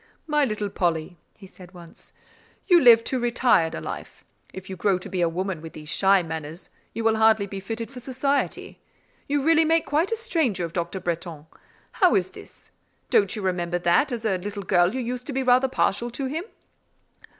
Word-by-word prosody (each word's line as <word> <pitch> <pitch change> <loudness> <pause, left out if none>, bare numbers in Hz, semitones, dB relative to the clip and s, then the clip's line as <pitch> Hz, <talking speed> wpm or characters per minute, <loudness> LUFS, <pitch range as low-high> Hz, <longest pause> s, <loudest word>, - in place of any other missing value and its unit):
"My 300 -2 +2
little 210 -4 -3
Polly," 170 -1 -2 0.2
he 200 - -13
said 185 -1 -15
once, 170 -2 -15 0.5
"you 350 -3 +5
live 230 -3 +7
too 260 - -2
retired 240 -8 +2
a - - -4
life; - - -8 0.3
if 190 0 -10
you 190 - -6
grow 190 +1 +1
to 185 - -9
be 185 -2 -2
a 170 - +2
woman 185 0 -3
with 165 0 -10
these 150 0 -8
shy 195 +1 +3
manners, 160 +1 -7 0.2
you 230 - -5
will 225 0 +2
hardly 220 -2 +4
be 195 0 -7
fitted 225 +5 -6
for 255 - -9
society. 265 +3 -2 0.5
You 285 -1 0
really 325 +1 +4
make 325 +1 +2
quite 310 +9 0
a - - +1
stranger 320 - -1
of 165 - -9
Dr. 175 +2 -3
Bretton: 170 -3 -5 0.5
how 365 - +3
is 185 -1 0
this? - - -14 0.4
Don't 435 - +3
you 210 - -5
remember 175 -2 -1
that, 175 +11 +2
as 235 -2 -4
a 190 -4 +1
little 200 +2 -6
girl, 175 +3 +2
you 260 - -2
used 250 +1 -5
to 285 - -4
be 265 +1 -1
rather 255 +1 +4
partial 240 -2 0
to 265 +3 -5
him?" 315 +7 -4
210 Hz, 200 wpm, -24 LUFS, 180-260 Hz, 0.5 s, live